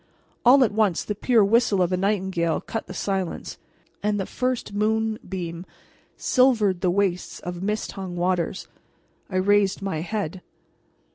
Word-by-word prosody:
All 260 +2 +7
at 225 - +2
once 205 -5 +1
the 210 - -3
pure 225 +1 +3
whistle 215 -1 +3
of 180 0 +2
a - - +4
nightingale 190 -3 0
cut 225 - -5
the - - -7
silence, 190 -3 -3 0.4
and 205 0 0
the 195 - -1
first 255 -4 -2
moonbeam 205 -5 -2 0.5
silvered 220 -8 +3
the 185 - +2
wastes 185 -1 -1
of 175 0 -6
mist 210 +2 -2
hung 190 -3 -6
waters. 180 +1 -1 0.6
I 190 - -6
raised 195 +1 +2
my 190 -6 -2
head. 190 -1 -3
195 Hz, 145 wpm, -24 LUFS, 180-215 Hz, 0.6 s, All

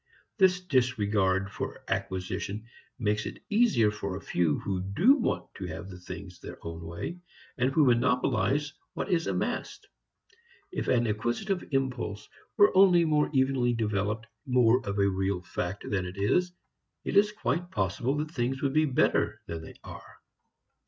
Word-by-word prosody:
This 185 -1 +4
disregard 105 - +1
for - - -5
acquisition 95 +3 -3 0.3
makes 105 -1 0
it - - -9
easier 205 - +4
for 100 -3 -4
a - - -6
few 85 -7 0
who 95 -2 -3
do 100 - +4
want 245 - -2
to 95 - -5
have 85 +3 -7
things 90 -1 -8
their - - -9
own 85 0 -6
way, 85 - -6 0.4
and 130 0 +1
who 150 +1 +4
monopolize 130 +3 +2 0.2
what - - -3
is 165 -2 +1
amassed. - - -3 0.8
If - - -3
an 120 -1 +3
acquisitive 120 - -1
impulse 125 -7 -2 0.3
were 205 -2 +6
only 180 -3 +6
more 150 -1 +2
evenly 130 -3 +2
developed, 105 0 -1 0.2
more 125 -1 +4
of 100 - -2
a 100 0 +3
real 95 -1 -1
fact, 90 +1 -4
than 95 -3 -1
it 90 +2 -8
is, 175 - +2 0.5
it - - -3
is 205 +1 +5
quite 175 -3 -2
possible 110 - -1
that 150 +1 -3
things 135 -1 -2
would 135 -1 +1
be 155 +1 +4
better 135 -4 +1
than 80 -1 -5
they 80 - -11
are. - - -11
120 Hz, 155 wpm, -28 LUFS, 100-150 Hz, 0.8 s, were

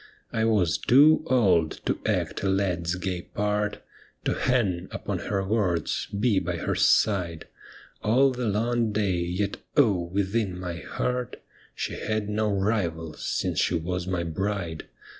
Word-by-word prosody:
I 110 -1 +1
was 105 -7 +2
too 145 +5 +6
old 95 -11 +3
to - - 0
act - - -1
a 95 - 0
lad's 90 -3 0
gay 90 -1 -3
part, 105 +2 -2 0.4
To - - +2
hang 100 -9 0
upon - - -4
her 100 -1 -2
words, 95 -6 0
be 105 0 +1
by 90 -1 -3
her - - -1
side 90 -6 +2 0.6
All 130 +5 +4
the 125 -2 -2
long 115 +2 +1
day, 100 -4 0
yet 90 +4 -2 0.2
oh 100 -11 +4
1 85 - -13
within 100 -2 0
my 90 -2 -4
heart 125 +6 -3 0.4
She - - -4
had 110 -1 -2
no 105 0 0
rival 95 -6 -1
since - - -2
she 90 - +2
was 90 +2 -2
my 90 -2 -1
bride. 85 -1 -3
100 Hz, 150 wpm, -26 LUFS, 90-110 Hz, 0.6 s, too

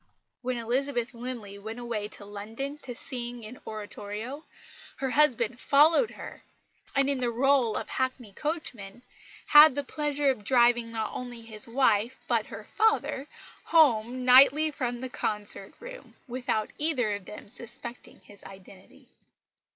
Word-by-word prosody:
When 255 0 -2
Elizabeth 245 +2 -1
Linley 230 -4 -7
went 220 +3 -7
away 235 -4 -4
to 210 -1 -11
London 225 +8 -6
to 250 -4 -7
sing 240 -2 -3
in 225 +4 -10
oratorio, 215 +5 -6 0.5
her 265 -1 -3
husband 250 -5 +3
followed 315 - +4
her; - - -10 0.5
and, 275 0 +3
in 280 -2 0
the 250 - +1
rôle 250 -1 +2
of - - -7
hackney 255 -5 -2
coachman, 245 - -5 0.5
had 295 -2 +9
the 285 - -1
pleasure 290 0 0
of 215 -5 -7
driving 240 0 +3
not 225 -1 -3
only 245 -2 -7
his 220 -1 -2
wife 230 -1 +2
but - - +1
her - - -9
father, 300 -10 0 0.4
home 255 -6 +3
nightly 275 +5 +7
from 245 -4 -3
the 260 - -4
concert 210 -4 -4
room, - - -11
without 245 -3 -2
either 270 -9 +1
of 200 -2 -6
them 210 - -10
suspecting 240 +2 -9
his 205 -1 -15
identity. 190 0 -15
245 Hz, 145 wpm, -28 LUFS, 220-275 Hz, 0.5 s, had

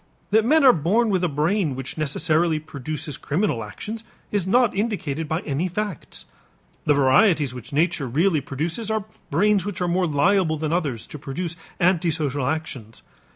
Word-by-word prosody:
That 220 +1 +5
men 310 +4 +4
are 260 -2 +8
born 205 +9 +2
with 185 -2 +1
a - - +3
brain 155 +1 0
which 130 0 -5
necessarily 155 +2 +1
produces 150 0 -5
criminal 150 - -1
actions 210 - -7 0.3
is 200 -3 0
not 240 +2 +3
indicated 175 -8 -2
by 160 +3 -1
any 150 +5 -1
facts. 195 -1 -5 0.6
The 145 - +4
varieties 145 - +4
which 125 -2 -9
nature 150 -2 +1
really 155 +5 +2
produces 165 - -3
are 220 -2 -1 0.2
brains 200 +5 +3
which 205 -2 -5
are 180 - 0
more 180 +1 +1
liable 160 +2 +2
than 155 +1 -2
others 145 -10 -1
to 150 - -9
produce 165 +5 -4 0.2
antisocial 160 -6 +1
actions. 135 -8 -4
160 Hz, 160 wpm, -23 LUFS, 145-195 Hz, 0.6 s, are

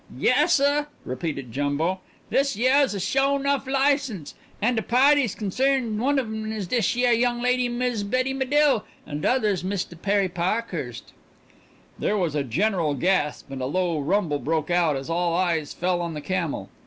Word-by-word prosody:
"Yassuh!" 285 +1 +3 0.2
repeated 135 -2 -4
Jumbo. 145 +8 -1 0.3
"This 275 -3 +2
yeah's 260 +1 +3
a - - -3
sho 275 +7 +1
nuff 280 -1 -1
license, 270 - 0 0.3
and 240 +4 +1
the 220 - 0
pa'ties 260 +1 +3
concerned 235 +1 0
one 280 +3 +2
of 265 - +1
'em 220 0 -5
is 215 -3 -3
dis 230 +3 0
yeah 245 0 +2
young 240 +1 +2
lady, 250 0 +1
Miz 240 -3 -1
Betty 255 +6 0
Medill, 270 -3 +2 0.2
and 150 0 -5
th' - - +1
other's 210 -8 +1
Mistah 185 -2 -3
Perry 200 +2 +1
Pa'khurst." 175 - -3 0.9
There 210 - 0
was 175 -6 0
a 150 - 0
general 165 - 0
gasp, 150 -2 0
and 135 -1 -5
a 130 - -1
low 175 +1 0
rumble 150 -1 0
broke 160 +2 -1
out 170 -4 +2
as 135 0 -5
all 170 0 0
eyes 170 -5 0
fell 175 0 -1
on 170 -2 -4
the 150 - -5
camel. 165 - -3
200 Hz, 170 wpm, -24 LUFS, 165-250 Hz, 0.9 s, Yassuh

